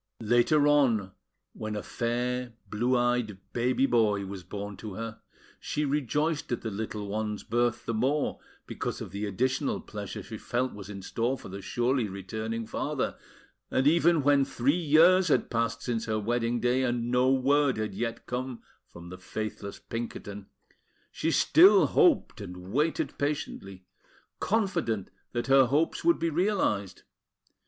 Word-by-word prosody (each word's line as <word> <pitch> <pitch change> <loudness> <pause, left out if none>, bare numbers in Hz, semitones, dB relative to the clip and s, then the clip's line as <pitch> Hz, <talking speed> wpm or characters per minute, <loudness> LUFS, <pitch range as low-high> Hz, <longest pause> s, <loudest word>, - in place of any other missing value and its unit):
Later 120 +7 +4
on, 120 -10 +3 0.4
when 110 -1 -5
a 105 - -4
fair, 125 +1 -2 0.2
blue 120 +4 +1
eyed 120 -4 0 0.2
baby 125 +2 +2
boy 105 -6 +2
was 95 -1 -7
born 100 +3 -6
to 105 -4 -7
her, 115 0 -6 0.4
she 150 - -2
rejoiced 145 +2 -1
at 120 - -1
the 110 - -3
little 105 0 -4
one's 105 0 -3
birth 120 +1 0
the 115 - -2
more 135 +7 0 0.3
because - - -4
of - - -7
the 105 +1 -3
additional 130 +7 0
pleasure - - -7
she - - -8
felt 125 +2 -1
was 100 -1 -9
in 100 -2 -7
store 120 +7 -1
for - - -11
the 100 +1 -7
surely 120 +2 0
returning 110 +4 -4
father; - - -2 0.5
and 130 - +1
even 165 0 +4
when 140 0 +4
three 135 0 +1
years 175 +3 +5
had 150 - +1
passed 115 0 -1
since 115 -2 -2
her 110 -1 -1
wedding 120 +2 0
day, 125 +2 +2
and 120 -2 -1
no 125 +1 +3
word 135 0 +3
had 110 -2 -3
yet 115 +3 -4
come 125 0 -4 0.2
from 85 0 -12
the 90 0 -9
faithless 105 +1 -5
Pinkerton, 105 -3 -6 0.6
she 160 - -1
still 345 - +6
hoped 340 - +3
and 90 -1 -8
waited 150 +4 0
patiently, 100 -10 -3 0.5
confident 175 - 0 0.2
that 120 -1 -1
her 135 -1 +5
hopes 150 +6 +1
would 340 0 +4
be 165 - -1
realised. 155 - 0
120 Hz, 155 wpm, -28 LUFS, 105-140 Hz, 0.6 s, still